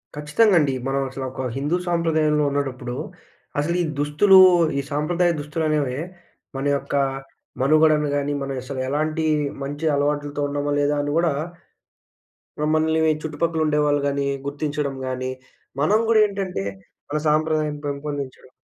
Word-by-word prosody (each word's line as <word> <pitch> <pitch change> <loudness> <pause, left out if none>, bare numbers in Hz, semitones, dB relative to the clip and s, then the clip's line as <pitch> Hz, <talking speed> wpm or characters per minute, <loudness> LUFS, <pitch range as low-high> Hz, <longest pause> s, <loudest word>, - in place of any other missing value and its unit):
ఖచ్చితంగా 155 +8 +3
అండి. 145 -3 +1
మనం 135 +1 0
అసలు 135 0 -5
ఒక 130 - -6 0.2
హిందూ 150 +5 0
సాంప్రదాయంలో 160 -3 +2
ఉండేటప్పుడు, 130 -3 -3 0.6
అసలీ 170 +4 0 0.2
దుస్తులు 150 +7 +5 0.4
ఈ - - 0
సాంప్రదాయ 170 +4 +1
దుస్తులనే‌వే 150 -3 -1 0.6
మన 135 - -3
యొక్క 140 0 -5 0.7
మనుగడను 155 +1 +4
గాని, 145 0 -1
మనం 135 0 -3
అసలు 135 0 -6
ఎలాంటి 155 +3 -1 0.4
మంచి 145 +3 -4
అలవాట్లతో 145 0 -1
ఉన్నామా 145 0 -1
లేదా 145 +1 +2
అని 145 0 -2
గూడా 170 -2 +3 1.5
మనల్ని 160 0 +2
చుట్టుపక్కల 160 +1 -1
ఉండేవాళ్ళు 150 -1 +2
గాని, 140 0 -1 0.2
గుర్తించడం 145 -1 -2
గాని 130 0 -3 0.5
మనం 205 +8 +4
గూడేంటంటే, 200 - +1 0.4
మన 150 - -1
సాంప్రదాయాన్ని 155 -1 +1
పెంపొందించడం 140 -2 -5
150 Hz, 120 wpm, -22 LUFS, 140-160 Hz, 1.5 s, దుస్తులు